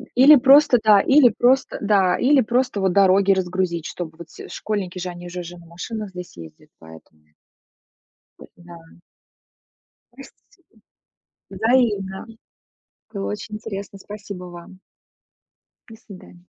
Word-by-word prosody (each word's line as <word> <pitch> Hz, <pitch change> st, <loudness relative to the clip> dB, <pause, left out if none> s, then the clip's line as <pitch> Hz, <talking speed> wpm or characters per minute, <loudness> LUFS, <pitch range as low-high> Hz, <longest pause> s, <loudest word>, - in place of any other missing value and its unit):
Или 270 Hz, +5 st, +7 dB
просто, 275 Hz, 0 st, +5 dB
да, 210 Hz, -2 st, +5 dB
или 270 Hz, -1 st, +4 dB
просто, 260 Hz, +2 st, +1 dB
да, 200 Hz, -3 st, +2 dB
или 275 Hz, +1 st, +3 dB
просто 245 Hz, -2 st, -1 dB
вот 190 Hz, -1 st, +1 dB
дороги 195 Hz, +1 st, +3 dB
разгрузить, 180 Hz, -3 st, -2 dB
чтобы 160 Hz, -3 st, -8 dB
вот 170 Hz, -1 st, -12 dB
все -, -, -12 dB
школьники 190 Hz, -4 st, -5 dB
же, 180 Hz, -, -5 dB
они 175 Hz, 0 st, -10 dB
же 180 Hz, +1 st, -7 dB
уже 175 Hz, 0 st, -9 dB
на 170 Hz, -, -16 dB
машинах 205 Hz, +6 st, -7 dB
здесь 180 Hz, -1 st, -11 dB
ездят, 80 Hz, -2 st, -14 dB
поэтому. 80 Hz, -1 st, -17 dB, 1.2 s
Поэтому -, -, -17 dB
да. 175 Hz, -1 st, -12 dB, 1.4 s
Просто -, -, -15 dB
си -, -, -29 dB, 0.9 s
взаимно. 205 Hz, -3 st, 0 dB, 0.9 s
Было 200 Hz, -2 st, -4 dB
очень 210 Hz, +1 st, -7 dB
интересно, 200 Hz, -2 st, -8 dB
спасибо 200 Hz, -2 st, -10 dB
вам. 175 Hz, +1 st, -13 dB, 1.1 s
До 225 Hz, -, -13 dB
свидания. 185 Hz, -4 st, -16 dB
195 Hz, 130 wpm, -21 LUFS, 175-220 Hz, 1.4 s, Или